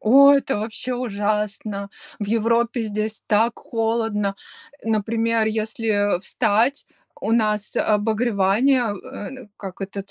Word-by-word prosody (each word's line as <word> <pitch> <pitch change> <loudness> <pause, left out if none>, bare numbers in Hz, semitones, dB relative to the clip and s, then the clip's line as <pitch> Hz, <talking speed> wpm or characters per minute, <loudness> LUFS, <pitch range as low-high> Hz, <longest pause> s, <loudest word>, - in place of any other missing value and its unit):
Ой, 280 +5 +7
это 270 -4 -2
вообще 225 +4 -3
ужасно! 210 -3 -2 0.3
В 205 - -3
Европе 230 +2 +1
здесь 215 0 -3
так 225 +2 +2
холодно. 225 -3 -1 0.5
Э, - - -6
например, 225 +1 +1
если, 220 +1 -2 0.3
э, - - -7
встать, 225 +7 +1 0.3
у - - -2
нас 215 -2 +1
обогревание, 220 +3 +2
э, 205 +1 -8
н 260 -5 -11
как 195 -1 -8
этот 195 0 -6
220 Hz, 125 wpm, -22 LUFS, 205-230 Hz, 0.5 s, Ой